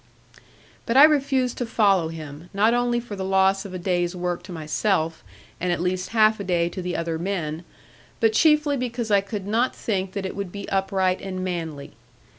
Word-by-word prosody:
But 230 Hz, +2 st, +2 dB
I 280 Hz, -, +10 dB
refused 270 Hz, -4 st, +3 dB
to 245 Hz, -, -1 dB
follow 200 Hz, -7 st, +3 dB
him, 160 Hz, 0 st, -9 dB
not 215 Hz, +3 st, +4 dB
only 240 Hz, 0 st, +1 dB
for 235 Hz, -3 st, -7 dB
the 190 Hz, -, -4 dB
loss 190 Hz, +1 st, +2 dB
of 190 Hz, -, -8 dB
a -, -, -2 dB
day's 175 Hz, 0 st, -1 dB
work 180 Hz, -1 st, -2 dB
to -, -, -6 dB
myself, 160 Hz, +1 st, -1 dB, 0.4 s
and 180 Hz, 0 st, -1 dB
at 175 Hz, -, 0 dB
least 185 Hz, +1 st, -1 dB
half 215 Hz, 0 st, +4 dB
a -, -, -3 dB
day 175 Hz, -2 st, +1 dB
to 185 Hz, -, -6 dB
the 180 Hz, 0 st, -3 dB
other 165 Hz, -1 st, -2 dB
men, 170 Hz, -3 st, -3 dB, 0.6 s
but 225 Hz, -1 st, +3 dB
chiefly 300 Hz, +1 st, +3 dB
because 240 Hz, -3 st, -3 dB
I 200 Hz, -1 st, +5 dB
could 200 Hz, 0 st, -6 dB
not 230 Hz, +5 st, +1 dB
think 190 Hz, -3 st, -2 dB
that 200 Hz, -2 st, -3 dB
it 190 Hz, -, -4 dB
would 200 Hz, -3 st, -4 dB
be 200 Hz, +1 st, -7 dB
upright 190 Hz, -1 st, 0 dB
and 185 Hz, -1 st, -4 dB
manly. 165 Hz, -6 st, -4 dB
190 Hz, 200 wpm, -24 LUFS, 175-220 Hz, 0.6 s, I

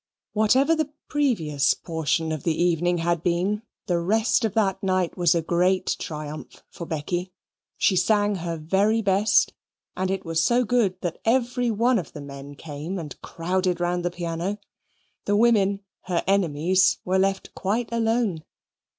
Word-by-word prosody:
Whatever 260 Hz, +9 st, +3 dB
the 315 Hz, -2 st, -1 dB, 0.2 s
previous 165 Hz, -, +1 dB
portion 160 Hz, -1 st, -1 dB
of 155 Hz, -2 st, -3 dB
the 160 Hz, +1 st, -1 dB
evening 175 Hz, 0 st, +2 dB
had 170 Hz, -1 st, 0 dB
been, 180 Hz, +5 st, 0 dB, 0.2 s
the 175 Hz, -2 st, +1 dB
rest 220 Hz, +7 st, +2 dB
of 220 Hz, -3 st, -1 dB
that 195 Hz, -3 st, +1 dB
night 185 Hz, -3 st, 0 dB
was 175 Hz, -2 st, +3 dB
a 165 Hz, -, 0 dB
great 180 Hz, +3 st, +1 dB
triumph 150 Hz, -1 st, -7 dB
for 170 Hz, -, -8 dB
Becky. 175 Hz, +4 st, -3 dB, 0.5 s
She 190 Hz, -, +3 dB
sang 205 Hz, +2 st, +2 dB
her 170 Hz, -1 st, -4 dB
very 200 Hz, +8 st, +1 dB
best, 200 Hz, +1 st, +3 dB, 0.4 s
and 185 Hz, 0 st, -1 dB
it 195 Hz, -1 st, -2 dB
was 165 Hz, 0 st, +1 dB
so 245 Hz, +6 st, +3 dB
good 205 Hz, -6 st, +1 dB
that 175 Hz, -2 st, -3 dB
every 245 Hz, +1 st, +1 dB
one 230 Hz, +2 st, +2 dB
of 160 Hz, -, -8 dB
the 150 Hz, -, -8 dB
men 140 Hz, 0 st, -9 dB
came 155 Hz, +5 st, -6 dB
and 155 Hz, -6 st, -6 dB
crowded 180 Hz, +1 st, -1 dB
round 175 Hz, 0 st, 0 dB
the 175 Hz, -, +1 dB
piano. 175 Hz, +3 st, -3 dB, 0.7 s
The 205 Hz, -, +2 dB
women, 205 Hz, -3 st, +3 dB, 0.2 s
her 175 Hz, -2 st, -1 dB
enemies, 185 Hz, -1 st, +2 dB
were 185 Hz, +1 st, +2 dB
left 195 Hz, 0 st, -1 dB
quite 220 Hz, +5 st, -1 dB
alone. 225 Hz, -7 st, 0 dB
185 Hz, 160 wpm, -24 LUFS, 165-210 Hz, 0.7 s, Whatever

